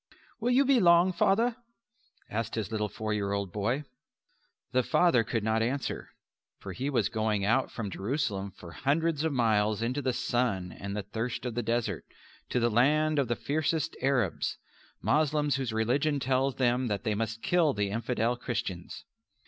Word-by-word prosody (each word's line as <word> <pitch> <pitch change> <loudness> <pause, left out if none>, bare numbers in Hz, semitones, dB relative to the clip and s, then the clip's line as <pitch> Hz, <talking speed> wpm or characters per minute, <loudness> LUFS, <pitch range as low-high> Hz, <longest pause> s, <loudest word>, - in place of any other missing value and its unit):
"Will 235 +2 0
you 260 +3 +4
be 265 -2 +4
long, 175 0 +5
Father?" 225 +7 +2 0.7
asked 115 +1 -3
his 110 -2 -3
little 105 -1 -1
four 110 +2 -3
year 100 -1 -1
old 100 -2 -2
boy. 115 +8 -1 0.9
The 130 +1 +3
father 125 -1 +3
could 110 0 -2
not 110 +1 +1
answer, 130 +4 -2 0.5
for - - -8
he 135 +3 -2
was 135 - +2
going 110 -3 0
out 130 +5 +2
from 105 -4 -5
Jerusalem 100 -3 -2
for 90 -2 -12
hundreds 150 - 0
of 160 - +1
miles 110 -4 +2
into 125 +5 -1
the 130 -1 +1
sun 120 -8 -1
and 100 +1 -6
the 105 - -2
thirst 115 +5 -4
of 125 - -2
the 120 - -1
desert, 115 -6 -1 0.5
to 125 - +1
the 120 0 +2
land 150 +6 +3
of 135 - +1
the 120 - 0
fiercest 155 +3 -1
Arabs 130 -8 0 0.5
Moslems 150 -1 +2
whose 130 -4 -2
religion 135 +7 +1
tells 135 +1 +1
them 125 0 +1
that 105 -3 -2
they 110 -2 0
must 110 +1 -3
kill 170 -5 +3
the 100 -1 -1
infidel 115 +1 0
Christians. 115 -8 -5
120 Hz, 175 wpm, -29 LUFS, 110-145 Hz, 0.9 s, long